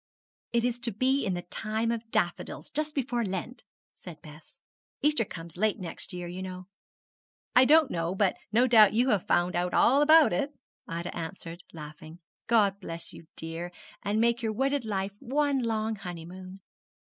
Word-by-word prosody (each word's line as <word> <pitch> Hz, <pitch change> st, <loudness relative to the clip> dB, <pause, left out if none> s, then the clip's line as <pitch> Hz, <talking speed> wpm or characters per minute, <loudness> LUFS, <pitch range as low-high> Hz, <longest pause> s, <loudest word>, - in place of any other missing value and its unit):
'It 235 Hz, 0 st, +2 dB
is 245 Hz, -1 st, -1 dB
to 235 Hz, -1 st, -2 dB
be 260 Hz, +6 st, +1 dB
in 190 Hz, -5 st, -1 dB
the 175 Hz, -, -4 dB
time 220 Hz, +5 st, -1 dB
of 230 Hz, -1 st, -4 dB
daffodils, 175 Hz, -5 st, -2 dB
just 305 Hz, 0 st, -2 dB
before 245 Hz, -3 st, 0 dB
Lent,' 210 Hz, +5 st, -5 dB, 0.3 s
said 170 Hz, -4 st, -10 dB
Bess; 155 Hz, 0 st, -14 dB, 0.5 s
'Easter 300 Hz, -5 st, +3 dB
comes 170 Hz, -4 st, -9 dB
late 215 Hz, +2 st, +1 dB
next 180 Hz, 0 st, -5 dB
year, 180 Hz, -1 st, -5 dB
you 180 Hz, +2 st, -6 dB
know.' 185 Hz, -1 st, -7 dB, 0.9 s
'I 250 Hz, +1 st, +8 dB
don't 310 Hz, +1 st, +5 dB
know; 170 Hz, +2 st, -1 dB
but 195 Hz, -1 st, +2 dB, 0.2 s
no 235 Hz, +4 st, +4 dB
doubt 220 Hz, -5 st, +7 dB
you 245 Hz, +4 st, +3 dB
have 205 Hz, -4 st, 0 dB
found 175 Hz, +1 st, +2 dB
out 180 Hz, +1 st, 0 dB
all 275 Hz, +4 st, +5 dB
about 310 Hz, -, +6 dB
it,' 280 Hz, +11 st, -1 dB, 0.3 s
Ida 170 Hz, +1 st, -5 dB
answered, 170 Hz, 0 st, -6 dB
laughing. 155 Hz, +1 st, -10 dB, 0.3 s
'God 205 Hz, -4 st, +3 dB
bless 165 Hz, -3 st, -8 dB
you, 160 Hz, -, -13 dB
dear, 165 Hz, +2 st, -5 dB, 0.3 s
and 205 Hz, +2 st, 0 dB
make 235 Hz, +1 st, +2 dB
your 220 Hz, -2 st, -1 dB
wedded 270 Hz, +2 st, 0 dB
life 195 Hz, -2 st, -2 dB
one 280 Hz, +1 st, +1 dB
long 220 Hz, -1 st, -1 dB
honeymoon!' 185 Hz, +1 st, -9 dB
205 Hz, 170 wpm, -28 LUFS, 175-240 Hz, 0.9 s, I